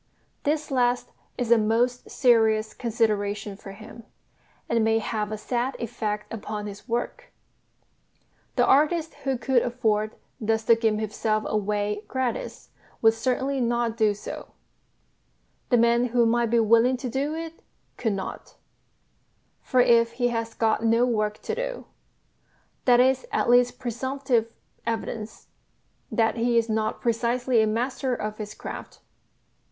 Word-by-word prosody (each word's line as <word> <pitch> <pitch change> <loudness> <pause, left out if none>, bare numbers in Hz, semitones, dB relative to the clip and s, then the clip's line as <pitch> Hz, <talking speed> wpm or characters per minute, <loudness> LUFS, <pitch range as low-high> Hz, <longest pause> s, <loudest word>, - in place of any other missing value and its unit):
This 300 0 0
last 245 -1 +1 0.3
is 245 -2 -2
a 235 - +7
most 235 +3 +1
serious 220 -4 +3
consideration 210 -3 -1
for 195 0 -10
him, 220 +3 -12 0.6
and 230 -1 +2
may 225 0 +3
have 215 -1 -2
a 215 - -3
sad 245 +4 -2
effect 215 -3 -4
upon 210 -1 -5
his 205 +3 -9
work. 240 - -3 1.2
The - - +4
artist 310 +3 +3
who 270 -1 +1
could 245 +1 +2
afford 220 -3 0 0.2
thus 220 0 0
to 230 - +5
give 225 -2 +1
himself 215 0 -1
away 210 0 -1
gratis 260 -3 -3 0.3
would 225 0 +7
certainly 260 +3 -1
not 235 -1 0
do 215 -3 +2
so; 205 - -7 1.2
the 245 - +4
man 235 +1 +4
who 240 -1 +2
might 235 0 +2
be 235 +1 +3
willing 230 +3 +4
to 255 - -5
do 275 +5 -2
it 330 0 -7 0.3
could 225 -4 -1
not; 195 -1 -6 1.1
for 255 - +2
if 230 -1 +4
he 245 0 +1
has 230 -1 -3
"got 225 0 +1
no 230 +2 +4
work 215 -3 -1
to - - -3
do" - - -4 1.0
that 245 -1 +6
is 260 +1 +3
at - - +1
least 245 0 +4
presumptive 255 -1 -1 0.3
evidence 225 -1 -5 0.6
that 225 0 +1
he 235 +1 +2
is 230 0 +2
not 220 0 -1
precisely 240 +1 +1
a 220 - +2
master 250 +3 -1
of 215 -1 -5
his 210 -1 -6
craft. - - -8
230 Hz, 140 wpm, -25 LUFS, 215-245 Hz, 1.2 s, a